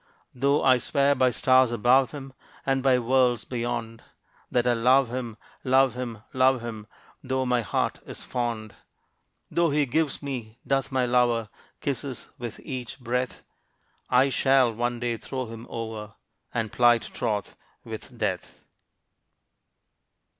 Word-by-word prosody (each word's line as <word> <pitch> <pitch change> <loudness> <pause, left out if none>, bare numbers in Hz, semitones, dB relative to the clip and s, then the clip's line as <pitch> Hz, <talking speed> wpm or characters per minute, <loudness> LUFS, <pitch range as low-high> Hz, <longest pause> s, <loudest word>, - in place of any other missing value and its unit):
Though 140 +3 +2
I 130 -2 +5
swear 140 +3 +2
by 130 -2 +3
stars 130 0 +4
above 125 +3 +4
him, 135 -3 -9 0.3
And 135 -1 +1
by 130 -1 +4
worlds 125 -1 +2
beyond, 120 -2 -3 0.5
That 120 -1 +1
I 125 - +4
love 125 +2 +4
him 120 -3 -5 0.3
love 130 -1 +4
him 120 -4 -6
love 130 -1 +3
him; 110 -3 -7 0.4
Though 130 0 -1
my 125 -1 +2
heart 110 - -1
is - - -6
fond; 115 -3 -3 0.8
Though 170 -1 +2
he 145 0 +2
gives 150 +2 0
me, 120 -5 -5
doth 135 0 0
my 130 -1 +2
lover, 120 -3 +2 0.3
Kisses 130 -3 -4
with 120 -2 -6
each 130 -2 -6
breath 125 +1 -2 0.7
I 130 +2 +4
shall 130 -3 +3
one 120 +1 -2
day 120 -1 -1
throw 130 +2 -4
him 115 +1 -9
over, 110 -2 -6 0.4
And 110 -2 -2
plight 120 -1 +4
troth 105 -4 -2 0.3
with - - -9
Death. - - -3
125 Hz, 140 wpm, -26 LUFS, 115-130 Hz, 0.8 s, I